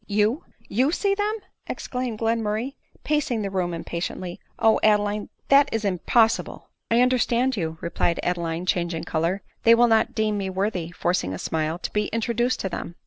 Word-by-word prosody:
" - - -34
You! 220 +9 +2 0.2
you 255 +8 +2
see 395 +3 +1
them 410 +1 0 0.2
!" - - -47
exclaimed 250 -3 -4
Glenmurray, 225 +2 -1 0.3
pa 300 0 +2
cing 240 -7 -2
the 195 - -3
room 180 -2 -1
impatiently; 170 +1 -4 0.2
"O 220 0 +4
Adeline, 210 -1 +2 0.2
that 280 0 +6
is 225 -1 -1
impos 210 +4 +3
sible - - -11
.'" - - -55
" - - -56
I 230 +1 +4
understand 250 0 +2
you," 160 -5 -3
replied 170 0 0
Adeline, 170 -1 -1
changing 170 -2 -1
color; 170 +3 -1
" - - -44
they 230 0 +7
will 240 +1 +5
not 225 -1 +2
deem 215 -2 +1
me 190 -1 -2
worthy," 190 -3 -2
forcing 175 - -1
a - - -5
smile, 160 - -2
"to - - -6
be 210 0 +1
introduced 235 +2 0
to 190 - -2
them." 170 -1 -6
210 Hz, 195 wpm, -24 LUFS, 175-235 Hz, 0.3 s, they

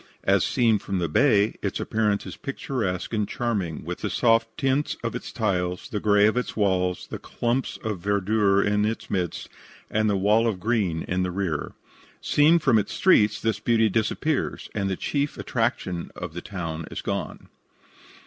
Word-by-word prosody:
As - - +3
seen 115 -3 +2
from 100 -1 -3
the 85 -2 0
bay, 105 - +3
its - - -2
appearance 105 -2 0
is - - -7
picturesque 115 -9 -3
and 105 -2 0
charming, 100 -12 -2
with 90 +1 -5
the - - -2
soft 115 -1 +3
tints 140 0 0
of - - -2
its - - -6
tiles, 90 -1 -1
the 105 - -2
grey 105 -1 +4
of 110 - +3
its 125 - -2
walls, 90 -3 +1
the - - -4
clumps 120 +2 -2
of 105 -4 -3
verdure 100 +1 +2
in 105 +1 +1
its 110 +2 -3
midst, 90 -4 -2 0.4
and 110 0 +2
the 100 - +2
wall 105 +4 +3
of 105 -5 -1
green 95 -6 0
in 90 +1 -1
the 90 - 0
rear. 90 -5 -2 0.5
Seen 155 +3 +4
from 135 -9 +3
its 105 - -3
streets 110 - +4
this 110 -2 -1
beauty 115 -1 +3
disappears, 115 +8 -1
and 100 -2 -1
the 95 - -1
chief 145 +8 -2
attraction 110 -7 -2
of 90 -3 -6
the 90 - -5
town 85 -5 -5
is - - -6
gone. - - -4
105 Hz, 175 wpm, -25 LUFS, 90-115 Hz, 0.5 s, grey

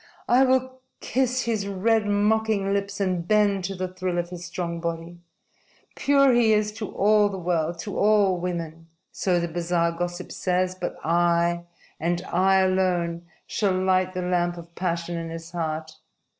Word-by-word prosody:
I 250 +2 +5
will 260 0 0 0.2
kiss 255 0 0
his 220 -4 -1
red, 210 +2 +1
mocking 205 -1 +1
lips 200 0 -2
and 185 -3 -1
bend 205 -3 +3
to 195 +1 -4
the 185 0 -3
thrill 185 -1 -3
of 175 0 -2
his 175 -1 -7
strong 175 -1 -4
body. 170 +1 -5 0.8
Pure 275 -2 +4
he 235 -2 +4
is 210 0 +1
to 215 -1 -6
all 210 +1 +4
the 195 - -5
world, 170 -2 -1
to 205 - -5
all 205 -3 +3
women 165 -2 -5 0.2
so 180 -2 0
the 170 - -1
bazaar 170 0 0
gossip 175 +1 -5
says 185 0 0
but 180 -1 -5
I, 170 +1 +2 0.3
and 175 +2 -1
I 190 +2 +3
alone, 175 -2 0 0.2
shall 200 -3 0
light 185 0 +1
the 180 - -2
lamp 175 -1 0
of 170 0 -11
passion 170 -1 -2
in 165 0 -5
his 165 0 -8
heart. 160 -2 -4
185 Hz, 165 wpm, -25 LUFS, 170-205 Hz, 0.8 s, I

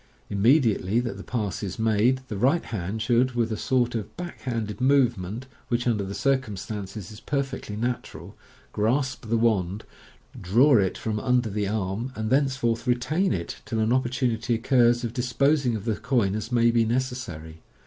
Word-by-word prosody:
Immediately 110 -1 +3
that 120 -1 -4
the - - -8
pass 105 -6 -3
is 100 -3 -4
made 115 +3 +2
the 105 - -5
right 135 - +2
hand 110 +1 -3
should, 120 +3 +2
with 115 -1 0
a - - 0
sort 125 +2 +1
of 110 -4 -5
back 175 0 -6
handed 115 -3 -3
movement, 125 -5 +2 0.2
which 120 0 0
under 110 -4 +1
the 100 +1 -5
circumstances 105 -7 -2
is 105 - -10
perfectly 135 -6 -3
natural, 120 +3 -4 0.4
grasp 125 +2 0
the 115 - +2
wand, 105 -3 +1 0.6
draw 120 +9 +5
it 95 -2 0
from 110 -1 -2
under 125 -2 +1
the 105 0 -1
arm, 105 +4 -2
and 110 +1 -3
thenceforth 130 -4 +1
retain 150 +10 +1
it 85 -1 -4
till 115 - -4
an 110 +2 +2
opportunity 120 -2 0
occurs 120 0 +3
of 115 -1 -3
dispos 135 +3 +1
ing 120 - +1
of 105 -1 -5
the 110 -3 0
coin 115 -7 +1
as 110 +3 -4
may 120 -1 +4
be 115 -1 +3
necessary. 110 -10 -3
115 Hz, 170 wpm, -25 LUFS, 105-125 Hz, 0.6 s, draw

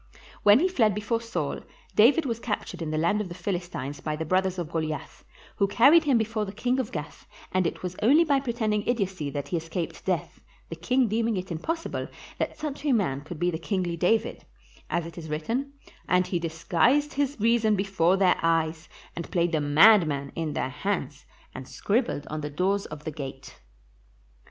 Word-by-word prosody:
When 205 +1 +7
he 365 - +4
fled 230 - +2
from - - -7
before 220 +2 -1
Saul, 230 0 -3 0.4
David 270 +9 +5
was 230 -3 -2
captured 210 -6 -4
in 160 - -3
the 155 - -1
land 170 +7 +2
of 195 - -5
the 175 - -7
Philistines 175 -7 -4
by 155 -1 -2
the 160 +1 -4
brothers 185 +2 +1
of 170 -2 -4
Goliath, 155 -3 -4 0.3
who 200 - +3
carried 280 +11 +6
him 275 -5 +4
before 220 -1 -1
the 195 - -5
king 250 +5 -1
of 255 - -2
Gath, 150 -1 -7 0.2
and 185 -2 +2
it - - -6
was 180 0 -4
only 285 +10 +6
by 285 -4 +2
pretending 230 -5 -1
idiocy 190 -10 -1
that 140 0 -5
he 175 - 0
escaped 165 +1 -5
death, 175 -2 -2 0.3
the 165 - -5
king 245 +10 +1
deeming 225 0 0
it 185 0 -5
impossible 330 - -3 0.3
that - - -2
such 295 -2 -5
a 290 -3 +2
man 160 - 0
could 155 +3 -8
be 175 +2 +1
the 160 - -4
kingly 180 -1 -2
David; 220 +7 0 0.5
as 170 - -1
it 170 +1 -8
is 160 -2 -8
written, 230 - -2 0.4
"And 180 0 +3
he 180 -1 -1
disguised 175 - +1
his 285 -2 -1
reason 220 -1 +3
before 190 -2 +2
their 190 -2 +3
eyes, 165 -1 0 0.3
and 170 - -6
played 175 -2 +1
the 155 -3 +1
madman 145 -2 +5
in 160 -3 -3
their - - -1
hands, 150 -2 -3 0.3
and 130 - -8
scribbled 215 - -1
on 155 0 -5
the 150 - -4
doors 190 +6 0
of 150 0 -9
the 155 - -4
gate." 135 -3 -8
185 Hz, 195 wpm, -26 LUFS, 160-225 Hz, 0.5 s, When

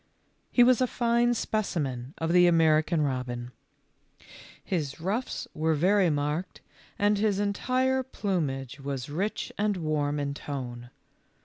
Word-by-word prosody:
He 245 - +6
was 250 0 +4
a 255 - +3
fine 240 0 +2
specimen 145 - -2
of 165 +1 -1
the 180 0 +6
American 160 -1 +3
robin. 125 -3 -3 1.1
His 155 -7 -3
ruffs 205 +9 -2
were 160 +1 +1
very 185 +4 +3
marked, 150 +4 -2 0.4
and 205 0 +2
his 205 -2 +1
entire 255 +6 +1
plumage 145 - -3
was 135 -1 -5
rich 195 +8 -2
and 205 -1 +1
warm 150 -3 -1
in 140 0 -2
tone. 125 -4 -6
165 Hz, 125 wpm, -28 LUFS, 140-205 Hz, 1.1 s, He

